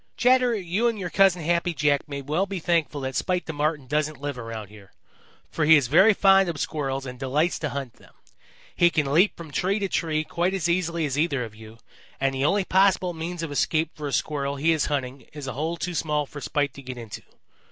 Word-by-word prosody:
"Chatterer, 250 Hz, 0 st, +4 dB
you 195 Hz, +4 st, 0 dB
and 230 Hz, -2 st, -1 dB
your 180 Hz, -4 st, -5 dB
Cousin 190 Hz, -3 st, +3 dB
Happy 170 Hz, +1 st, 0 dB
Jack 145 Hz, 0 st, +1 dB
may 140 Hz, -1 st, -5 dB
well 155 Hz, +8 st, 0 dB
be 195 Hz, -1 st, -4 dB
thankful 165 Hz, -4 st, 0 dB
that 130 Hz, -1 st, -4 dB
Spite 180 Hz, -1 st, -1 dB
the 160 Hz, -, -5 dB
Marten 150 Hz, -1 st, -1 dB
doesn't 150 Hz, +2 st, -1 dB
live 145 Hz, -1 st, -4 dB
about 115 Hz, -4 st, -7 dB
here, 105 Hz, -2 st, -16 dB, 0.6 s
for 160 Hz, -, -1 dB
he 160 Hz, +1 st, +7 dB
is 140 Hz, -, +1 dB
very 190 Hz, +8 st, +6 dB
fond 195 Hz, -1 st, +5 dB
of 165 Hz, -, -4 dB
Squirrels 135 Hz, -3 st, -2 dB
and 125 Hz, -1 st, -8 dB
delights 145 Hz, +6 st, 0 dB
to 150 Hz, -, -2 dB
hunt 135 Hz, -4 st, -5 dB
them. -, -, -20 dB, 0.6 s
He 175 Hz, -, +5 dB
can 145 Hz, -4 st, 0 dB
leap 180 Hz, +7 st, +4 dB
from 165 Hz, -3 st, -9 dB
tree 190 Hz, +7 st, 0 dB
to 200 Hz, -2 st, -1 dB
tree 155 Hz, -4 st, -1 dB
quite 175 Hz, +4 st, -1 dB
as 175 Hz, -4 st, -1 dB
easily 170 Hz, -2 st, 0 dB
as 145 Hz, 0 st, -2 dB
either 145 Hz, -5 st, +1 dB
of 110 Hz, -2 st, -8 dB
you, 110 Hz, +1 st, -13 dB, 0.4 s
and 135 Hz, 0 st, +1 dB
the 135 Hz, +1 st, -1 dB
only 195 Hz, +4 st, +2 dB
possible 185 Hz, -1 st, +3 dB
means 165 Hz, +1 st, -5 dB
of 160 Hz, -, -4 dB
escape 155 Hz, +2 st, 0 dB
for 150 Hz, -2 st, -5 dB
a -, -, -4 dB
Squirrel 140 Hz, -1 st, -1 dB
he 155 Hz, +4 st, +2 dB
is 160 Hz, -3 st, +1 dB
hunting 135 Hz, -2 st, -3 dB
is 145 Hz, -2 st, -7 dB
a 130 Hz, -, -4 dB
hole 160 Hz, +4 st, -3 dB
too 175 Hz, +2 st, -4 dB
small 150 Hz, -2 st, -1 dB
for 145 Hz, +1 st, -10 dB
Spite 145 Hz, -2 st, -1 dB
to 140 Hz, -, -11 dB
get 130 Hz, -1 st, -8 dB
into. 115 Hz, -4 st, -8 dB
155 Hz, 230 wpm, -25 LUFS, 140-175 Hz, 0.6 s, he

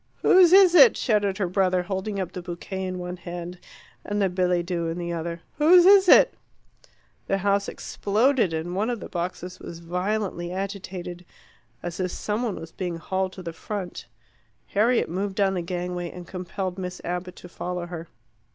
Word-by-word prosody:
"Whose 365 Hz, -2 st, +7 dB
is 380 Hz, -2 st, +7 dB
it?" 465 Hz, +6 st, +8 dB
shouted 205 Hz, -5 st, +1 dB
her 195 Hz, -3 st, 0 dB
brother, 185 Hz, 0 st, +1 dB
holding 195 Hz, +2 st, -3 dB
up 185 Hz, -3 st, -3 dB
the 180 Hz, -, -6 dB
bouquet 190 Hz, +2 st, -5 dB
in 185 Hz, 0 st, -4 dB
one 180 Hz, 0 st, -5 dB
hand 175 Hz, 0 st, -7 dB, 0.4 s
and 205 Hz, 0 st, -2 dB
the 195 Hz, -2 st, +2 dB
billet 180 Hz, -1 st, +1 dB
doux 170 Hz, -2 st, -2 dB
in 165 Hz, +1 st, -3 dB
the 170 Hz, -1 st, -3 dB
other. 170 Hz, 0 st, -4 dB, 0.2 s
"Whose 345 Hz, +4 st, +7 dB
is 390 Hz, -1 st, +7 dB
it?" -, -, +7 dB, 0.9 s
The 195 Hz, -, +1 dB
house 200 Hz, +1 st, +1 dB
exploded, 225 Hz, 0 st, +1 dB
and 165 Hz, +2 st, -3 dB
one 210 Hz, +5 st, 0 dB
of 240 Hz, -2 st, -2 dB
the -, -, -7 dB
boxes 180 Hz, +1 st, -5 dB
was 170 Hz, -, -8 dB
violently 180 Hz, +1 st, -2 dB
agitated, 185 Hz, -2 st, -5 dB, 0.6 s
as 175 Hz, 0 st, -5 dB
if 185 Hz, -1 st, 0 dB
some 210 Hz, +5 st, -3 dB
one 230 Hz, -5 st, -1 dB
was 165 Hz, 0 st, -9 dB
being 180 Hz, -1 st, -4 dB
hauled 190 Hz, +3 st, -2 dB
to 185 Hz, -, -9 dB
the 170 Hz, -1 st, -5 dB
front. 190 Hz, +1 st, -6 dB, 0.6 s
Harriet 230 Hz, +4 st, +2 dB
moved 190 Hz, +3 st, -3 dB
down 195 Hz, -1 st, +2 dB
the 180 Hz, -, -1 dB
gangway, 175 Hz, 0 st, -4 dB
and 180 Hz, 0 st, -9 dB
compelled 185 Hz, 0 st, -5 dB
Miss 180 Hz, -1 st, -5 dB
Abbott 180 Hz, +1 st, -4 dB
to -, -, -11 dB
follow 180 Hz, 0 st, -5 dB
her. 170 Hz, -1 st, -7 dB
185 Hz, 180 wpm, -25 LUFS, 175-200 Hz, 0.9 s, it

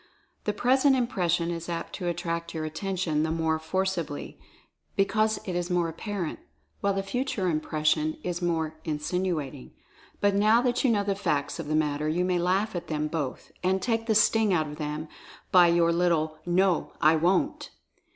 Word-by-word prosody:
The 210 Hz, -, +2 dB
present 265 Hz, +5 st, +3 dB
im 250 Hz, -2 st, +2 dB
pression 175 Hz, -5 st, 0 dB
is 170 Hz, 0 st, -5 dB
apt 170 Hz, -1 st, -4 dB
to 180 Hz, -, -4 dB
attract 170 Hz, -1 st, -3 dB
your 155 Hz, -1 st, -2 dB
attention 165 Hz, -1 st, -1 dB
the 160 Hz, -, 0 dB
more 160 Hz, -1 st, 0 dB
forci 185 Hz, +2 st, -1 dB
bly, 145 Hz, -1 st, -7 dB, 0.6 s
because 215 Hz, +2 st, +2 dB
it 185 Hz, -, -3 dB
is 175 Hz, 0 st, -2 dB
more 175 Hz, -2 st, +1 dB
apparent 180 Hz, +1 st, -4 dB, 0.2 s
— -, -, -43 dB
while 200 Hz, -1 st, +1 dB
the 195 Hz, -, -1 dB
Future 230 Hz, -2 st, -2 dB
Impression 155 Hz, -, 0 dB
is 175 Hz, 0 st, -3 dB
more 160 Hz, -2 st, -1 dB
"insinuating." 155 Hz, -, -3 dB, 0.5 s
But 205 Hz, 0 st, +3 dB
now 215 Hz, +3 st, +5 dB
that 245 Hz, -1 st, +1 dB
you 265 Hz, -, +4 dB
know 210 Hz, -3 st, +2 dB
the 200 Hz, 0 st, 0 dB
facts 155 Hz, -6 st, -1 dB
of 165 Hz, -, -5 dB
the 155 Hz, -, 0 dB
matter 150 Hz, 0 st, 0 dB
you 175 Hz, +3 st, +1 dB
may 180 Hz, -1 st, +1 dB
laugh 190 Hz, +4 st, +1 dB
at 175 Hz, -, -4 dB
them 150 Hz, -1 st, -1 dB
both, 150 Hz, -5 st, -4 dB
and 190 Hz, +1 st, +2 dB
take 225 Hz, +3 st, -1 dB
the 220 Hz, -, +2 dB
sting 215 Hz, 0 st, +4 dB
out 160 Hz, -4 st, +2 dB
of 150 Hz, 0 st, -8 dB
them 150 Hz, +1 st, -4 dB, 0.4 s
by 180 Hz, -2 st, +7 dB
your 170 Hz, 0 st, +3 dB
little 160 Hz, -3 st, +1 dB
"No, 180 Hz, 0 st, +2 dB
I 155 Hz, 0 st, +5 dB
Wont"! 185 Hz, -, +1 dB
175 Hz, 185 wpm, -27 LUFS, 160-195 Hz, 0.6 s, by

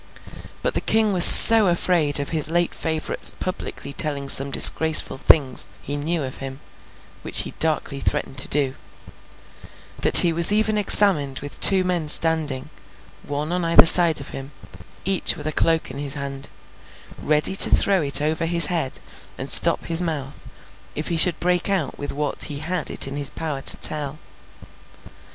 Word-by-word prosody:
But, -, -, -4 dB
the -, -, -5 dB
King 220 Hz, -2 st, -2 dB
was 180 Hz, -2 st, +5 dB
so 225 Hz, -3 st, +8 dB
afraid 170 Hz, -4 st, -1 dB
of 140 Hz, -, -7 dB
his 155 Hz, -3 st, -3 dB
late 175 Hz, +1 st, -2 dB
favourite's 160 Hz, -1 st, +1 dB
publicly 185 Hz, -5 st, -10 dB
telling 140 Hz, -2 st, 0 dB
some 135 Hz, +1 st, +6 dB
disgraceful 155 Hz, -1 st, +3 dB
things 135 Hz, -4 st, 0 dB
he 145 Hz, -, -9 dB
knew 155 Hz, +2 st, -6 dB
of 130 Hz, -1 st, -10 dB
him—which 135 Hz, +1 st, -6 dB
he -, -, -6 dB
darkly 155 Hz, -3 st, -2 dB
threatened 135 Hz, 0 st, -5 dB
to -, -, -1 dB
do—that 135 Hz, -2 st, -4 dB
he 170 Hz, -2 st, +6 dB
was 170 Hz, +3 st, +4 dB
even 215 Hz, +1 st, -1 dB
examined 170 Hz, -9 st, +1 dB
with 145 Hz, 0 st, -11 dB
two 190 Hz, -1 st, +3 dB
men 175 Hz, -4 st, -5 dB
standing, 155 Hz, -5 st, -2 dB, 0.5 s
one 145 Hz, +2 st, -8 dB
on 180 Hz, 0 st, -5 dB
either 165 Hz, 0 st, +3 dB
side 165 Hz, -2 st, +5 dB
of 140 Hz, -, -11 dB
him, 135 Hz, +1 st, -11 dB, 0.5 s
each 190 Hz, -1 st, 0 dB
with 150 Hz, -, -11 dB
a 155 Hz, -, -4 dB
cloak 165 Hz, -2 st, -3 dB
in 135 Hz, -, -11 dB
his 140 Hz, 0 st, -6 dB
hand, 140 Hz, 0 st, -10 dB, 0.7 s
ready 150 Hz, +5 st, -2 dB
to -, -, +5 dB
throw 195 Hz, -3 st, -1 dB
it 145 Hz, 0 st, +2 dB
over 160 Hz, +2 st, -5 dB
his 170 Hz, -1 st, +6 dB
head 160 Hz, -6 st, -4 dB, 0.4 s
and -, -, -9 dB
stop -, -, +4 dB
his 165 Hz, +1 st, -1 dB
mouth 150 Hz, -5 st, -8 dB, 0.5 s
if 150 Hz, -, -7 dB
he 170 Hz, -, -4 dB
should 170 Hz, +1 st, +3 dB
break 180 Hz, +1 st, -3 dB
out 185 Hz, -8 st, -5 dB
with 145 Hz, -, -7 dB
what 145 Hz, 0 st, -2 dB
he 145 Hz, -3 st, -7 dB
had 165 Hz, +3 st, -7 dB
it -, -, 0 dB
in 140 Hz, +1 st, -8 dB
his 140 Hz, -2 st, +1 dB
power 150 Hz, -4 st, -8 dB
to -, -, +1 dB
tell. 150 Hz, -1 st, -3 dB
155 Hz, 170 wpm, -18 LUFS, 140-175 Hz, 0.7 s, so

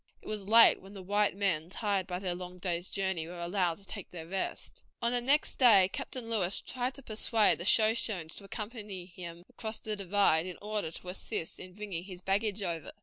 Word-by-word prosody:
It -, -, -15 dB
was 215 Hz, -1 st, -3 dB
late 230 Hz, +2 st, +7 dB
when 195 Hz, +2 st, -13 dB
the 190 Hz, -, -8 dB
white 205 Hz, +1 st, +1 dB
men, 175 Hz, -5 st, 0 dB
tired 195 Hz, -2 st, -1 dB
by 180 Hz, -2 st, -3 dB
their 185 Hz, -1 st, -2 dB
long 180 Hz, 0 st, -7 dB
day's 175 Hz, -1 st, -2 dB
journey, 190 Hz, -5 st, -1 dB
were 175 Hz, +1 st, -8 dB
allowed 175 Hz, -1 st, 0 dB
to 200 Hz, -, -15 dB
take 200 Hz, -1 st, -7 dB
their 165 Hz, -2 st, -8 dB
rest. 190 Hz, +3 st, -4 dB, 0.2 s
On 235 Hz, -, +1 dB
the 245 Hz, 0 st, +2 dB
next 280 Hz, +5 st, +2 dB
day 200 Hz, -7 st, +7 dB
Captain 250 Hz, -3 st, -4 dB
Lewis 200 Hz, -5 st, +2 dB
tried 250 Hz, +1 st, -3 dB
to 275 Hz, -, -10 dB
persuade 220 Hz, -3 st, +3 dB
the 175 Hz, -, -5 dB
Shoshones 215 Hz, -6 st, +3 dB
to -, -, -8 dB
accompany 205 Hz, -3 st, -6 dB
him 175 Hz, -1 st, -9 dB
across 220 Hz, -1 st, -4 dB
the 215 Hz, -1 st, -1 dB
divide 195 Hz, -4 st, +3 dB
in 180 Hz, -, -7 dB
order 210 Hz, -4 st, -2 dB
to 180 Hz, +2 st, -8 dB
assist 180 Hz, -3 st, -4 dB
in 185 Hz, -, -9 dB
bringing 200 Hz, -5 st, -5 dB
his 185 Hz, -2 st, -8 dB
baggage 200 Hz, +2 st, 0 dB
over. 170 Hz, -4 st, -4 dB
195 Hz, 205 wpm, -31 LUFS, 180-215 Hz, 0.2 s, late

